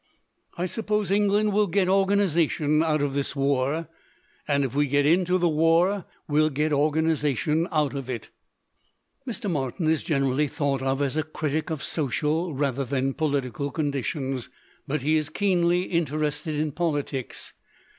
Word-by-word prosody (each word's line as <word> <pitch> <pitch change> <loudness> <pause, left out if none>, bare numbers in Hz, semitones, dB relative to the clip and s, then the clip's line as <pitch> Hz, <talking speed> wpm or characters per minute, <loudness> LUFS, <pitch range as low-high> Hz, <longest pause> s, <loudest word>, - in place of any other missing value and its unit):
"I 175 - -1
suppose 210 0 -1
England 205 +1 +2
will 210 0 +3
get 190 +1 +1
organization 175 -6 +2
out 155 -2 +1
of 140 -1 -1
this 140 0 -2
war. 140 +3 0 0.6
And 140 -1 +2
if 130 - -4
we 145 +1 +2
get 145 +1 +2
into 180 +3 +3
the 175 -1 +2
war, 165 +4 +2 0.2
well 155 +1 +3
get 150 +2 0
organization 155 +1 +1
out 150 -4 +1
of 135 -2 -5
it." 120 -3 -5 1.0
Mr. 230 -3 -3
Martin 145 -2 -2
is 160 -1 +2
generally 135 -1 +1
thought 140 -2 -1
of 135 +1 0
as 140 +2 -1
a 155 - +1
critic 155 +1 -3
of 155 -3 -4
social 155 +4 -1
rather 140 -1 0
than 135 0 -1
political 140 -3 -1
conditions. 135 -3 -2 0.4
But 145 -1 -2
he 155 +2 +3
is 155 -1 -1
keenly 175 -1 +2
interested 155 -2 -1
in 150 0 -1
politics. 145 -5 -3
155 Hz, 150 wpm, -25 LUFS, 140-170 Hz, 1.0 s, will